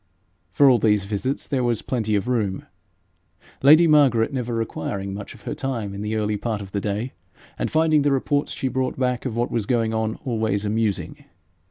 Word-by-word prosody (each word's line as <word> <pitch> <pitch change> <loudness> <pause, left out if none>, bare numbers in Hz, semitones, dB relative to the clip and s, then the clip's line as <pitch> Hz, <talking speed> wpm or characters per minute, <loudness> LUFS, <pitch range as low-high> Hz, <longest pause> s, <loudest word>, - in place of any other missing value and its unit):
For 140 +10 +4
all 125 -3 +5
these 105 -3 +2
visits 110 +7 -3
there 135 -3 0
was 120 -2 0
plenty 110 -4 -1
of 100 +3 -1
room, 105 -7 -1 1.0
lady 155 +5 +7
Margaret 140 -6 +4
never 125 -3 -2
requiring 100 -3 -3
much 100 +5 -8
of 110 - -18
her - - -4
time 115 -7 -3
in 100 - -6
the 105 +1 -2
early 105 -1 0
part 110 -1 -3
of 100 -2 -9
the 100 - -2
day, 105 +5 -3 0.5
and - - -1
finding 155 -1 +3
the 145 0 +2
reports 145 +2 0
she 135 - -3
brought 130 0 -2
of 125 -2 -1
what 120 +1 -1
was 110 -4 -1
going 115 -3 +1
on 110 0 -1
always 110 -4 -1
amusing. 105 -2 -2
115 Hz, 190 wpm, -23 LUFS, 105-130 Hz, 1.0 s, lady